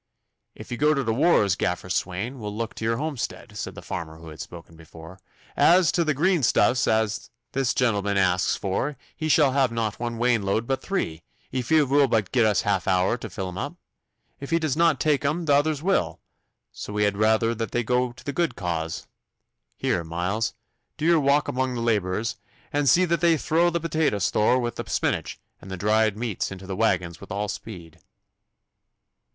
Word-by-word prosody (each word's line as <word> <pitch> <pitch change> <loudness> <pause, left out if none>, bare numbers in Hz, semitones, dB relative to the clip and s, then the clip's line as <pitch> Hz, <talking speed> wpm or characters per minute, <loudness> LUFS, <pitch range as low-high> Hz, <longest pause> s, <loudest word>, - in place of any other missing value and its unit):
'If - - -11
you 120 - -3
go 150 +3 +3
to 140 - 0
t' 115 - +1
wars, 115 - +3
Gaffer 90 -2 -2
Swain, 95 +8 -2
we'll 105 -1 -5
look 115 -1 -3
to - - -8
your 115 +1 +1
homestead,' 145 -2 -4
said - - -5
the - - -10
farmer 80 -1 -6
who 80 0 -11
had 75 - -9
spoken 85 -1 -11
before. 80 +2 -13 0.4
'As 175 -1 +5
to 170 - +1
t' 155 -2 +1
greenstuffs 145 -5 +2
as 110 -1 0 0.2
this 135 -2 0
gentleman 100 -5 +1
asks 95 -1 +2
for 125 +9 -2 0.2
he 155 -1 -3
shall 145 -3 +5
have 130 -2 +2
not 115 -2 -2
one 120 -1 -3
wainload 115 -2 +1
but 135 +1 -1
three, 85 - -3 0.3
if 130 -2 -3
he 155 -1 +5
will 140 +1 +3
but 110 -5 0
gi' 120 - +3
us 105 -3 +3
half 100 -4 0
an 95 - +4
hour 90 +4 +2
to 115 -2 -7
fill 95 +1 -5
them 90 0 -6
up. - - -4 0.6
If 140 - -7
he 165 - +3
does 155 -5 -1
not 165 -4 +3
tak 150 -3 +2
them 155 +4 -1
t' 145 - +3
others 145 +1 +2
will, 195 +2 0 0.5
so 105 - -8
we 105 0 +1
had 105 -1 +1
raither 110 +2 +2
that 115 0 -3
they 120 - -1
go 125 +1 +1
to 120 - -15
the 145 - -4
good 170 +3 0
cause. 80 -3 -3 0.7
Here, 85 - 0
Miles, 90 +7 -2 0.4
do 155 - -3
you 170 -1 +5
wak 145 +1 +3
the - - -3
labourers, 115 -5 -1 0.4
and 145 -1 +2
zee 185 +7 +5
that 170 -1 0
they 170 -2 +4
throw 165 +4 +2
the 170 0 -1
potato 160 -8 0
store 105 +5 +2
wi' 120 -2 -1
the - - -7
spinach - - -1 0.2
and 95 - -11
the 95 - -5
dried 105 +2 +2
meats 115 -5 -3
into 95 0 -8
the 95 0 -4
waggons 90 -5 0
wi' - - -10
all 105 +1 -2
speed. 90 -7 -8
115 Hz, 200 wpm, -25 LUFS, 100-145 Hz, 0.7 s, As